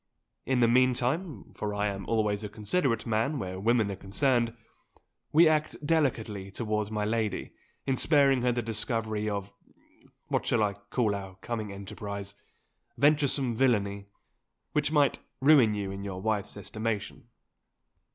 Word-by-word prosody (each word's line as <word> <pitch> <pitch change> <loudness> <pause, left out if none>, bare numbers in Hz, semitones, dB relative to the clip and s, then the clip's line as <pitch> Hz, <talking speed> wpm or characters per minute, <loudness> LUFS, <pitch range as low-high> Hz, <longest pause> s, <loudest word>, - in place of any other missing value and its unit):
In 130 -2 +2
the 120 - +6
meantime 130 +7 +1
(for 105 -1 -4
I 105 0 0
am 100 -1 -3
always 105 -2 0
a 105 - -4
considerate 115 - -1
man 115 +7 0
where 95 -5 -4
women 110 0 +2
are - - -4
concerned) 115 +4 0 0.7
we 165 +2 +7
act 155 0 +1
delicately 115 -11 0
towards 105 0 -2
my 105 -1 -1
lady, 110 -1 -2 0.3
in 135 - +1
sparing 140 -2 +4
her 125 0 +2
the 120 0 -1
discovery 110 -1 -2
of 100 -1 -4 0.7
what - - -1
shall 115 -3 +3
I 100 -1 +1
call 105 +2 -1
our 95 -2 -6
coming 110 -4 -4
enterprise? 100 0 -6 0.6
venturesome 140 -3 +3
villainy, 100 -5 +1 0.6
which 150 0 +1
might 145 -3 +3 0.2
ruin 130 -6 +5
you 100 -2 -3
in 95 0 -6
your 95 -2 -5
wife's 105 0 -2
estimation. 110 +1 -4
110 Hz, 140 wpm, -29 LUFS, 100-130 Hz, 0.7 s, we